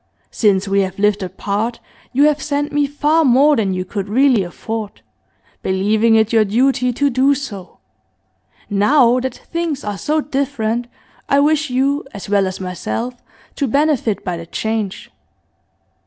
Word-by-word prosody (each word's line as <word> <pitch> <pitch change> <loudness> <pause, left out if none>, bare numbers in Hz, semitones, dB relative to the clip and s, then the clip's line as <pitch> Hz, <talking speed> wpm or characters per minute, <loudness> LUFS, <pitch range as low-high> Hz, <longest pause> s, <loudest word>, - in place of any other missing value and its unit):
Since 200 -2 +2
we 195 0 +2
have 190 -1 -3
lived 210 0 +2
apart 200 +5 -3 0.3
you 275 +3 +3
have 300 0 +3
sent 290 0 -2
me 290 -1 +1
far 300 +3 +2
more 280 +3 +5
than 210 -6 0
you 185 0 -3
could 200 0 -5
really 255 0 +3
afford, 210 +4 -6 0.6
believing 215 +4 +2
it 220 0 +2
your 220 -1 +5
duty 250 +4 +1
to 280 +3 0
do 265 +3 +3
so; 210 -10 -8 0.9
now 240 +5 +3
that 255 -1 -3
things 335 -4 -4
are 205 -2 -4
so 310 +1 0
different 245 -5 -2 0.4
I 280 - +4
wish 305 +1 +2
you, 275 +3 0
as 200 - -7
well 200 -1 +2
as 185 +1 -5
myself, 190 +6 -4 0.4
to 280 - 0
benefit 275 -5 0
by 180 -2 -2
the 165 0 -9
change. 220 0 -3
235 Hz, 155 wpm, -18 LUFS, 200-280 Hz, 0.9 s, more